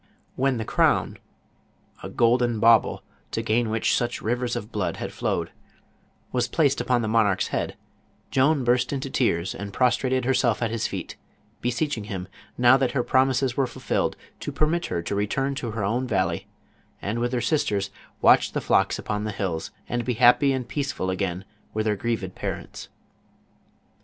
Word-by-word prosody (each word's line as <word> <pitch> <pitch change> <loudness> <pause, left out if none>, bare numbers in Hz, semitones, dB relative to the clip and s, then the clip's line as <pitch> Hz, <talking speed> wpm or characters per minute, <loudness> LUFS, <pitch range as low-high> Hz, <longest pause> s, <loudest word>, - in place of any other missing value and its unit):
When 135 -1 +1
the 110 - -3
crown - - +2 0.4
— - - -32
a - - -5
golden 120 -1 +2
bauble, 115 0 +4 0.3
to - - -3
gain 115 +1 +1
which 110 0 +1
such 120 - -1
rivers 120 +2 -1
of 105 +3 -5
blood 105 -3 -2
had - - -5
flowed - - -2 0.4
— - - -38
was 125 -1 +1
placed 140 -1 +2
upon 120 -1 +1
the - - -1
monarch's 110 -3 +2
head, - - -2 0.5
Joan 140 +1 +3
burst 125 +1 +2
into 135 -1 -3
tears 95 -7 +1
and 100 0 -6
prostrated 125 +2 +1
herself 125 -3 +2
at 115 - 0
his 115 -1 -1
feet, - - -6 0.4
beseeching 120 -1 -1
him, 95 -4 -5 0.3
now 125 +1 +6
that 130 -2 0
her 125 - +1
prom 130 +2 +3
ises 130 -1 0
were 135 -2 +1
fulfilled, - - -1 0.2
to - - -4
permit 170 +3 0
her 85 - -2
to 85 - -3
return 120 +8 0
to 125 -3 -4
her 110 -1 -3
own 120 +6 0
valley, 95 -5 0 0.5
and 105 +4 -3
with 120 0 0
her 125 - 0
sisters 100 -11 0 0.3
watch - - +5
the - - 0
flocks - - +2
upon 105 0 -3
the 110 - -2
hills, 95 -5 -3 0.2
and 120 0 -1
be 125 +1 -1
hnppy 125 +4 +5
and 130 -3 -2
peaceful 140 -9 -2
agnin 95 -1 -2 0.3
with 110 0 0
her 105 -1 +2
grieved 100 -3 -2
parents. - - -6
120 Hz, 175 wpm, -25 LUFS, 105-130 Hz, 0.5 s, now